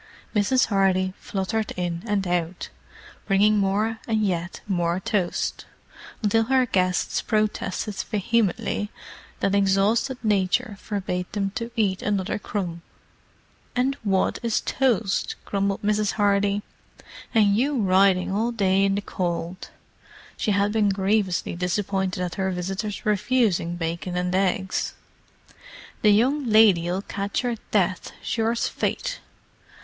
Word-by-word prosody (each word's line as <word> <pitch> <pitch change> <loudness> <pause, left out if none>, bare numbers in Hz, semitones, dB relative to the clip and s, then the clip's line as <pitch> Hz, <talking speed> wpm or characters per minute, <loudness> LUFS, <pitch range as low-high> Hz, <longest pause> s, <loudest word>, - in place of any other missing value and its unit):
Mrs. 215 +6 +3
Hardy 190 -2 +2
fluttered 210 +2 -2
in 175 -2 -2
and 205 -2 0
out, 175 0 -2 0.6
bringing 210 +1 +4
more 210 +3 0
and 220 -2 +1
yet 175 -2 -2
more 175 -2 0
toast, 190 -2 -1 0.6
until 225 +2 +3
her 260 +1 +3
guests 185 -5 0
protested 215 -1 -1
vehemently 215 0 0 0.5
that 195 - +1
exhausted 200 +6 +2
nature 210 +2 +1
forbade 185 -3 -3
them 200 -2 -1
to 230 +2 -4
eat 200 -4 +1
another 205 -1 -1
crumb. 175 -6 -4 0.9
"And 260 +2 +1
wot 195 -3 +1
is 235 -2 0
toast?" 230 -7 0
grumbled 200 0 -1
Mrs. 210 0 +1
Hardy, 205 -1 +2 0.7
"and 205 -3 +4
you 270 +4 +1
ridin' 190 -2 +3
all 220 +4 0
day 195 -4 +2
in 195 0 +2
the 200 - -1
cold!" 175 -2 -4 0.7
She - - -2
had 200 0 +2
been 215 -2 +2
grievously 195 -2 0
disappointed 185 +1 -1
at 175 -1 -4
her 190 - +1
visitors' 195 +3 -4
refusing 210 -5 +1
bacon 170 +1 -3
and 180 0 -1
eggs. 190 0 0 1.1
"The 210 - +5
young 255 +7 +3
lady'll 195 -4 +4
catch 200 +5 -3
'er 240 -2 -1
death, 190 -3 0
sure's 230 +1 0
fate! - - -2
200 Hz, 125 wpm, -24 LUFS, 185-215 Hz, 1.1 s, The